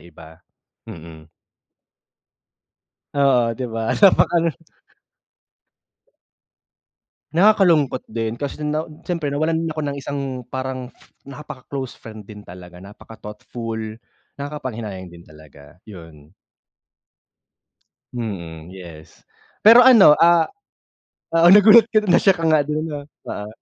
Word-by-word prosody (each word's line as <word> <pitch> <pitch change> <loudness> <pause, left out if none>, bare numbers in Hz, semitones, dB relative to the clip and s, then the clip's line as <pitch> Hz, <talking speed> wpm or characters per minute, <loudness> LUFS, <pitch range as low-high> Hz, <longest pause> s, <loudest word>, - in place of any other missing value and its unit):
iba. 80 -1 -16 0.5
Mm. 80 -1 -12 1.9
Oo, 130 -5 +2
'di 125 +3 -6
ba? 115 0 -3
Napakalung 170 -5 +3 2.8
Nakakalungkot 170 -8 +2
din 115 0 -4
kasi 140 +3 -6
nawa 150 +1 -2 0.2
siyempre 165 -5 -3
nawalan 160 +3 -1
ako 155 - -5
ng 140 -2 -4
isang, 140 0 -6 0.3
parang, 130 -1 -6 0.3
napakaclose 140 -2 -9
friend 110 -2 -13
din 105 -1 -12
talaga, 90 0 -13
napaka-thoughtful, 110 +3 -9 0.6
nakakapanghinayang 115 -10 -7
din 85 0 -16
talaga, 75 +1 -18
yun. 80 -6 -14 1.8
Mm, 85 -9 -7
yes. 85 -4 -14 0.4
Pero 230 +3 +9
ano, 240 -10 +7
ah 170 0 +5 0.9
oo, 165 +1 +3
nagulat 215 +2 +7
ka 215 - +4
do'n, 210 - -5
na - - +5
shock 190 -4 +2
ka - - -1
nga 155 -2 +2
do'n, 150 +1 -3
'no, 145 -1 -5 0.3
oo. 105 - -6
130 Hz, 105 wpm, -20 LUFS, 95-155 Hz, 2.8 s, Pero